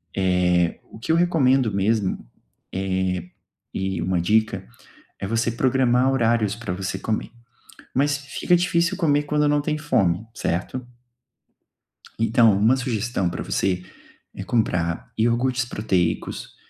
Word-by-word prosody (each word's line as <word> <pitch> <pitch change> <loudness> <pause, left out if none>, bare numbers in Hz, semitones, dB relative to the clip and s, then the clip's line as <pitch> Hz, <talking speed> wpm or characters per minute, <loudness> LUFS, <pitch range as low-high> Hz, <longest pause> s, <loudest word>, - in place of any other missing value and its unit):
Eh, 90 -2 +2
o - - -11
que 130 - -2
eu - - +4
recomendo 135 -8 +3
mesmo, 100 - 0 0.5
eh, 95 -2 -1 0.5
e 95 -1 -2
uma 90 -1 0
dica, 110 +1 +1 0.5
é - - -4
você 115 +2 0
programar 130 +1 +2
horários 115 -5 +2
para 115 -5 -5
você 95 +1 -4
comer, 110 +1 -3 0.6
mas 145 +2 +2
fica 145 +5 +1
difícil 170 -1 +1
comer 145 -5 +2
quando 150 0 +1
não 145 0 +2
tem 150 +1 -1
fome, 95 - +1
certo? 90 +6 -2 1.4
Então, 115 0 +5
uma 110 +6 +4
sugestão 120 -6 -1
para 90 - -4
você 90 -2 -1 0.5
é - - -6
comprar 90 -7 -1
iogurtes 120 +3 +1
proteicos, 100 -7 -2
115 Hz, 125 wpm, -23 LUFS, 95-130 Hz, 1.4 s, Então